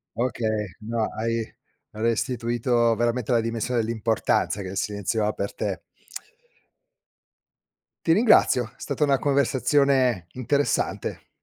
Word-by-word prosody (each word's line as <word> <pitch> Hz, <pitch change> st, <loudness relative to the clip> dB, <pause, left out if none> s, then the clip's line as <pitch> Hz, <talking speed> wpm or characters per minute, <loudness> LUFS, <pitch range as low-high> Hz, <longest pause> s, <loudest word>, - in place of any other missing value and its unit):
Okay, 110 Hz, -3 st, -1 dB
no 115 Hz, +1 st, -2 dB
hai 115 Hz, +1 st, -1 dB, 0.5 s
hai 110 Hz, -, -9 dB
restituito 120 Hz, 0 st, +1 dB
veramente 120 Hz, +1 st, -1 dB
la 120 Hz, -1 st, +4 dB
dimensione 115 Hz, +2 st, -1 dB
dell'importanza 110 Hz, -2 st, 0 dB
che 95 Hz, -, -6 dB
il 95 Hz, -, -6 dB
silenzio 105 Hz, +2 st, -1 dB
ha 105 Hz, -, +1 dB
per 100 Hz, -1 st, -4 dB
te. -, -, -3 dB, 2.3 s
Ti 165 Hz, -, +5 dB
ringrazio, 165 Hz, -, +4 dB
è -, -, -34 dB
stata 145 Hz, +1 st, -2 dB
una 140 Hz, -2 st, +3 dB
conversazione 135 Hz, -, +2 dB
interessante 140 Hz, +3 st, -1 dB
115 Hz, 115 wpm, -25 LUFS, 110-130 Hz, 2.3 s, Ti